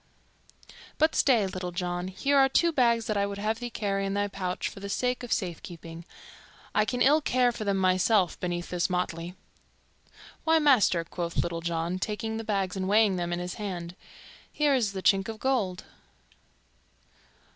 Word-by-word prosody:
But 315 +1 +3
stay, 235 -7 +3
Little 185 -1 -4
John, 175 0 -3
here 230 +10 0
are 270 -1 +5
two 335 +5 +3
bags 235 -5 +2
that 215 -2 -1
I 200 0 +1
would 200 0 -5
have 215 +2 -1
thee 245 -1 -4
carry 200 -3 -2
in 195 0 -2
thy 205 0 +1
pouch 185 -2 -3
for - - -8
the 200 0 -6
sake 250 +5 -1
of 245 - -8
safekeeping. 170 -2 -4 0.7
I 215 - +3
can 245 +2 0
ill 300 +3 +5
care 250 -3 +2
for 220 -2 -6
them 200 -1 +1
myself 185 +1 +2
beneath 175 -1 -3
this 180 0 0
motley." 180 -1 -3 1.1
"Why, 325 0 +4
master," 255 - +4
quoth 170 0 -5
Little 170 -1 -3
John, 170 +2 -2
taking 220 +2 -3
the 225 - -4
bags 195 -4 -1
and 190 -1 -2
weighing 210 -2 +4
them 175 0 -2
in 175 - -1
his 180 0 -4
hand, 175 -4 -5 0.6
"here 295 -2 +2
is 225 -7 +1
the 190 -1 -5
chink 195 +1 +3
of 220 - -5
gold." 215 -9 0
195 Hz, 180 wpm, -28 LUFS, 180-230 Hz, 1.1 s, are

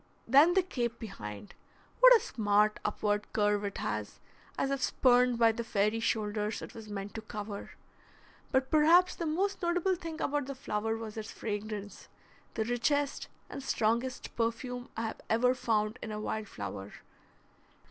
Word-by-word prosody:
Then 290 +9 +6
the 380 - +4
cape 240 -9 -2
behind, 105 - -8 0.5
what - - +10
a - - -5
smart 210 - +1
upward 210 0 -1
curve 205 -1 +2
it 200 -1 -3
has, - - -4 0.4
as 275 - 0
if 275 -1 -1
spurned 250 -1 +4
by 230 -1 +5
the 235 +1 -4
fairy 215 0 +1
shoulders 210 -1 -1
it - - -9
was 220 -2 -10
meant 200 0 -5
to 225 - -5
cover! 210 -1 -7 0.8
But 265 0 +1
perhaps 335 +4 +6
the 335 - -3
most 385 +6 0
notable 350 +2 +1
thing 330 -2 -6
about 290 -3 -1
the 275 - -5
flower 225 -4 -2
was 225 -1 -7
its 220 -1 -5
fragrance, 210 -1 -5 0.5
the 220 - 0
richest 270 +5 0 0.2
and - - -7
strongest 235 0 -1
perfume 245 +2 -2
I 225 - -1
have 220 - -5
ever 250 +3 +4
found 220 -2 0
in 220 - -5
a 210 - -4
wild 215 0 -3
flower. 100 - -7
225 Hz, 160 wpm, -31 LUFS, 210-270 Hz, 0.8 s, what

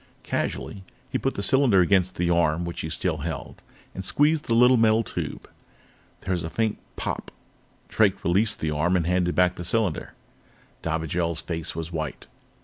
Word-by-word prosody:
Casually, 100 -2 -3 0.3
he - - 0
put - - -1
the 100 - -3
cylinder 130 -4 +4
against 90 0 +3
the 85 0 0
arm 85 0 +2
which 85 - -5
he 80 - -4
still 80 +1 -1
held 75 -1 -6 0.3
and 95 - -6
squeezed 150 +9 +2
the 115 - +1
little 125 +2 +6
metal 115 -1 +4
tube. - - -5 0.7
There 95 - -4
was 90 -2 0
a 80 - -4
faint 110 +3 -1 0.2
pop! - - -4 0.6
Drake 100 -3 +2
released 105 +6 +2
the 80 - 0
arm 80 +5 +1
and 85 -3 +1
handed 90 0 +1
back 90 0 +4
the 90 - -7
cylinder. 105 -4 -1 0.7
Dobigel's 80 0 -1
face 80 -2 -4
was 80 +1 -5
white. 80 -2 -4
90 Hz, 170 wpm, -25 LUFS, 80-105 Hz, 0.7 s, little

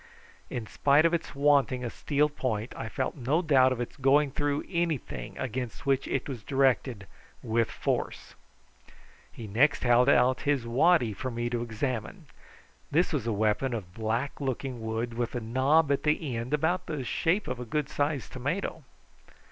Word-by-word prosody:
In 120 -3 -4
spite 145 +7 +3
of 170 - +3
its 170 -4 -2
wanting 140 -3 +3
a 120 - -3
steel 150 0 +1
point 125 -6 -3
I 110 - -5
felt 130 +3 -2
no 145 +6 0
doubt 130 -5 +5
of 130 - -2
its 120 - -5
going 140 +1 +3
through 145 +1 -1
anything 170 -6 -3
against 125 0 -4
which 135 -1 +1
it 135 - -2
was 130 -6 -5
directed 130 -3 +1 0.4
with 115 0 +1
force. - - -3 1.0
He 115 - -9
next 125 +8 +2
held 125 +1 +5
out 125 -1 +4
his 140 -4 0
waddy 125 0 +3
to 130 +5 -4
me 120 0 -3
to 120 -1 -1
examine. 115 -1 -4 0.6
This 170 +3 +2
was 130 -6 -1
a - - +1
weapon 110 +4 +1
of 90 -6 -7
black 115 +7 -2
looking 130 -2 -3
wood, 115 +2 -2
with 120 +1 -3
a - - 0
knob 135 +7 +2
at 140 - +1
the 150 -4 0
end 115 +3 -4
about 165 +5 0
the 150 -4 -3
shape 175 - 0
of 125 -1 -3
a - - -4
good 145 +5 -1
sized 145 -3 -2
tomato. 145 +5 -3
130 Hz, 170 wpm, -28 LUFS, 120-145 Hz, 1.0 s, doubt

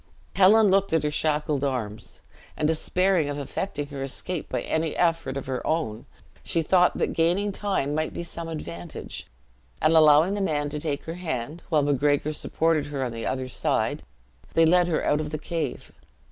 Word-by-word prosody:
Helen 205 +2 +6
looked 195 -2 +2
at 160 - +2
her 150 - 0
shackled 150 -2 0
arms, 120 -6 -4 0.4
and 150 - +1
despairing 175 0 +1
of 145 - -3
effecting 145 +2 -3
her 140 -2 -6
escape 155 +5 -3
by - - -2
any 160 -1 -2
effort 165 -6 +1
of 135 - -5
her 130 -1 -3
own, 155 -10 -2 0.4
she 165 - -1
thought 180 +2 +3
that - - 0
gaining 180 +5 +1
time 190 -8 -1
might 155 +1 -1
be - - -5
some 170 -1 -5
advantage; 85 - -7 0.5
and 155 - +3
allowing 155 +3 +6
the 205 - -2
man 145 -6 0
to 150 - -3
take 145 -2 -2
her 165 - -5
hand, 160 -3 -4
while 155 -3 +3
Macgregor 145 +1 +1
supported 160 0 0
her 140 -2 -3
on 125 - -2
the 115 0 -5
other 130 0 -2
side, 125 - 0 0.5
they 165 - +6
led 175 +2 +4
her 165 -3 0
out 150 - +2
of 155 -1 -3
the 155 - -3
cave. 155 -4 -4
155 Hz, 185 wpm, -25 LUFS, 145-170 Hz, 0.5 s, Helen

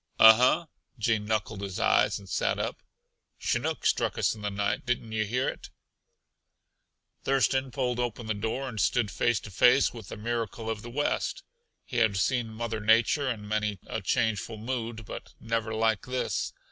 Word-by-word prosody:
"Uh 110 0 +10
huh!" 125 +8 +3 0.3
Gene 110 -2 +1
knuckled 110 -1 -1
his 95 -2 -4
eyes - - +3
and 100 - -12
sat - - 0
up. - - -3 0.6
"Chinook - - -1
struck - - +1
us - - +2
in 110 - -10
the 105 - -1
night. 100 0 -1
Didn't 120 -2 -2
yuh 110 -1 0
hear 125 +5 0
it?" - - -5 1.5
Thurston 135 0 +2
pulled 125 -2 -1
open 120 -1 -2
the 110 - -1
door 110 +6 -3
and 115 -6 -3
stood 110 0 +2
face 115 +5 +1
to 105 - -10
face 125 +8 +5
with 115 -5 -9
the - - -7
miracle 115 0 -3
of 110 -2 -4
the 120 - -8
West. 145 - -1 0.4
He 125 - -5
had 110 -4 +3
seen 120 +3 +1
Mother 110 0 -3
Nature 115 +6 +3
in 105 -4 -4
many 105 -1 -1
a - - -4
changeful 110 -1 0
mood, 115 -1 -4
but - - -9
never 115 -1 -2
like 110 +1 +1
this. 125 0 -1
115 Hz, 175 wpm, -28 LUFS, 105-125 Hz, 1.5 s, Uh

